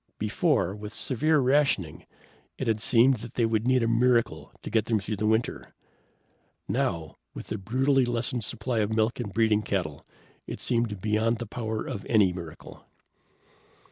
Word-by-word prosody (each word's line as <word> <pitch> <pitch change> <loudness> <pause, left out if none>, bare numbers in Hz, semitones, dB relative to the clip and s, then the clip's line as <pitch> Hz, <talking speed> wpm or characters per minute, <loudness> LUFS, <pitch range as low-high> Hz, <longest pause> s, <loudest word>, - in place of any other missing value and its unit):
Before, 105 - +1
with 105 +1 -8
severe 155 +5 +1
rationing, 135 - +1 0.5
it 130 - -3
had 110 -1 +1
seemed 125 +3 +4
that 115 +2 -10
they 120 - +2
would 110 +1 0
need 130 -2 +3
a - - +1
miracle 115 0 +1
to - - -6
get 110 -2 +2
them 110 -1 +1
through 105 +2 -4
the 105 +2 0
winter. 110 +2 -1 0.9
Now, 80 -3 -2 0.2
with - - -8
the - - -3
brutally 130 +6 +2
lessened 120 0 -1
supply 115 +2 -2
of 105 -1 +1
milk 110 +2 +1
and 110 -5 -4
breeding 110 0 +2
cattle, 90 -9 -3 0.4
it - - -6
seemed 115 -5 -1
beyond 110 +2 +1
the 120 - -5
power 110 0 -4
of 100 - -5
any 100 -5 +4
miracle. 85 -3 -10
110 Hz, 165 wpm, -27 LUFS, 105-120 Hz, 0.9 s, seemed